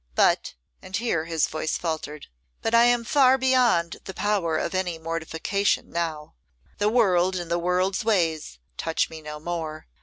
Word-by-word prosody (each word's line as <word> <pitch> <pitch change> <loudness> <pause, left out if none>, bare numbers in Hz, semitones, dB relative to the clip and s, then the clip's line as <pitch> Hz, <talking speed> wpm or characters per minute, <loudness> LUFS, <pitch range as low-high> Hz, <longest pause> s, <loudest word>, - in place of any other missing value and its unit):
But,' - - +2 0.3
and 190 - -4
here 210 -9 -1
his 165 -3 +1
voice 155 0 -2
faltered, 155 -3 -4 0.4
'but 225 - -1
I 235 +1 +7
am 240 -1 +3
far 265 0 +4
beyond 250 -10 +2
the 190 - -7
power 190 -6 0
of - - -2
any 185 -3 -1
mortification 165 +4 -1
now. 160 -3 -3 0.5
The 205 0 +3
world 190 -6 +3
and 175 -2 -4
the 170 - +1
world's 180 +3 0
ways 165 - 0 0.2
touch 165 -1 -1
me 160 -1 -8
no 150 0 -7
more. 160 -1 -5
175 Hz, 160 wpm, -25 LUFS, 160-210 Hz, 0.5 s, I